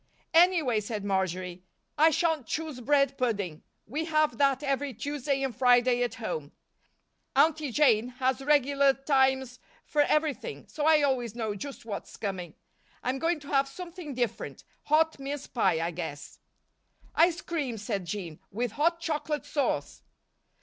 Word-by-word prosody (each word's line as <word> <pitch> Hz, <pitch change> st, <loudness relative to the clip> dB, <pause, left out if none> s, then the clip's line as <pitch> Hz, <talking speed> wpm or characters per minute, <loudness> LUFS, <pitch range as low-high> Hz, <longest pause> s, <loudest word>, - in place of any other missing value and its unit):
"Anyway," 330 Hz, -9 st, +5 dB
said 210 Hz, -1 st, -4 dB
Marjory, 185 Hz, -2 st, -1 dB, 0.3 s
"I 315 Hz, +2 st, +6 dB
shan't 320 Hz, -5 st, 0 dB
choose 310 Hz, -5 st, -4 dB
bread 275 Hz, +1 st, +2 dB
pudding. 200 Hz, -10 st, -1 dB, 0.2 s
We 300 Hz, +8 st, -3 dB
have 310 Hz, -6 st, +1 dB
that 275 Hz, 0 st, +3 dB
every 275 Hz, -2 st, -1 dB
Tuesday 280 Hz, +2 st, -2 dB
and 265 Hz, -4 st, -2 dB
Friday 245 Hz, 0 st, +4 dB
at 245 Hz, -, -1 dB
home. 485 Hz, -, -5 dB, 0.8 s
Aunty 310 Hz, -3 st, +3 dB
Jane 240 Hz, -5 st, +4 dB
has 260 Hz, +1 st, 0 dB
regular 280 Hz, -1 st, +4 dB
times 265 Hz, -2 st, +1 dB, 0.3 s
for 300 Hz, -, +2 dB
everything, 305 Hz, -1 st, 0 dB
so 300 Hz, 0 st, -2 dB
I 310 Hz, -2 st, +5 dB
always 245 Hz, -5 st, 0 dB
know 220 Hz, -3 st, -2 dB
just 265 Hz, +5 st, -8 dB
what's 205 Hz, -3 st, -6 dB
coming. 185 Hz, -5 st, -4 dB, 0.5 s
I'm 260 Hz, +2 st, -1 dB
going 330 Hz, +2 st, +1 dB
to 290 Hz, -, -11 dB
have 275 Hz, -1 st, +3 dB
something 340 Hz, -1 st, -8 dB
different 240 Hz, -2 st, -3 dB, 0.2 s
hot 315 Hz, 0 st, +3 dB
mince 280 Hz, +1 st, -4 dB
pie, 190 Hz, -9 st, +1 dB
I 165 Hz, +1 st, -1 dB
guess." 160 Hz, -4 st, -7 dB, 0.7 s
"Ice 340 Hz, +1 st, +3 dB
cream," 285 Hz, -9 st, -3 dB
said 205 Hz, -3 st, -3 dB
Jean, 170 Hz, -4 st, -5 dB
"with 240 Hz, +3 st, -2 dB
hot 335 Hz, +7 st, +1 dB
chocolate 300 Hz, -2 st, -2 dB
sauce." 285 Hz, -3 st, -1 dB
270 Hz, 145 wpm, -28 LUFS, 225-300 Hz, 0.8 s, I